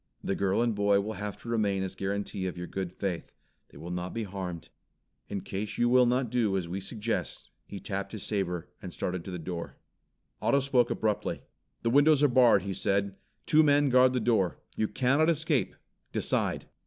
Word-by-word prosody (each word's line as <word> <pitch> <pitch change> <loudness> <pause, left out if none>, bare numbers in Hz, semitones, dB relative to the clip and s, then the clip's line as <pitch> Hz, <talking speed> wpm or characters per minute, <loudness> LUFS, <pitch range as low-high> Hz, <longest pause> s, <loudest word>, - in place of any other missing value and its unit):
The - - 0
girl 100 +3 +1
and 120 -1 +1
boy 100 -1 +3
will 105 +2 -3
have 105 0 -5
to - - -11
remain 105 -4 +1
as 95 - -4
guarantee 100 -1 -3
of 90 - -5
your 90 - -4
good 95 -1 -4
faith. 95 -2 -4 0.4
They - - -15
will 85 +4 -7
not 90 +2 -4
be 115 - -1
harmed. 90 -4 -6 0.6
In 100 -1 -3
case 100 +3 -5
you 120 0 +3
will 125 0 +5
not 125 -1 +1
do 110 -6 +1
as 90 -3 -3
we 95 +3 -4
suggest 110 +3 -4
" - - -48
He 100 - -7
tapped 100 -1 -4
his 110 - -6
saber, 90 -5 -2
and 90 - -7
started 90 0 -3
to - - -6
the 90 - -4
door. 85 0 -6 0.6
Otto 140 - +3
spoke 130 -3 +2
abruptly. 105 -2 -1 0.4
"The 115 - +1
windows 145 +2 +5
are - - +7
barred," 125 -2 +5
he 100 -1 -3
said. 100 +1 0 0.3
"Two 155 - +5
men 145 -1 +4
guard 130 0 +5
the 125 - +1
door. 110 -6 +1 0.2
You 110 - 0
cannot 140 +8 +2
escape. 160 -4 +1 0.4
Decide!" - - 0
100 Hz, 200 wpm, -29 LUFS, 95-125 Hz, 0.6 s, are